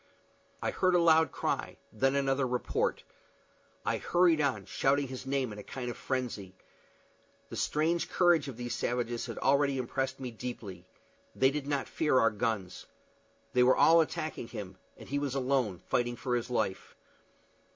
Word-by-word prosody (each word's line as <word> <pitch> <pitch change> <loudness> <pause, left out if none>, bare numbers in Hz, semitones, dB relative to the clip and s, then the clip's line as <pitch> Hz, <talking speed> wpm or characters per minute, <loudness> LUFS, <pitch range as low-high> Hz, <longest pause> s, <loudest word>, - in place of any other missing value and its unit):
I - - 0
heard 185 -1 +2
a - - +5
loud 160 -3 +5
cry; - - -2 0.2
then 135 +5 +2
another 135 -1 +1
report. 125 0 -1 0.8
I - - +1
hurried 175 -3 +3
on, 140 -2 0
shouting 140 +1 +1
his 130 0 -7
name 135 -4 -1
in 105 - -9
a - - -8
kind 125 +1 -5
of - - -8
frenzy. 120 -8 -4 0.9
The - - -7
strange 165 +3 0
courage 175 -5 +3
of 130 -4 -7
these 120 0 -4
savages 120 0 -2
had 115 - -6
already 140 0 +2
impressed 135 +1 -2
me 130 -2 -5
deeply. 105 -6 -7 0.5
They 135 0 +4
did 145 -1 -4
not 140 -2 -1
fear 150 -5 +1
our 115 - +4
guns. 105 -4 -3 0.7
They 125 - +4
were 125 +1 +5
all 165 +1 +7
attacking 155 -6 -3
him, 100 -5 -8 0.2
and - - -12
he 145 +1 -1
was 140 -2 -2
alone, 125 -9 0
fighting 120 0 0
for 125 +1 -2
his 120 0 -2
life. 110 -6 -2
130 Hz, 165 wpm, -31 LUFS, 120-140 Hz, 0.9 s, all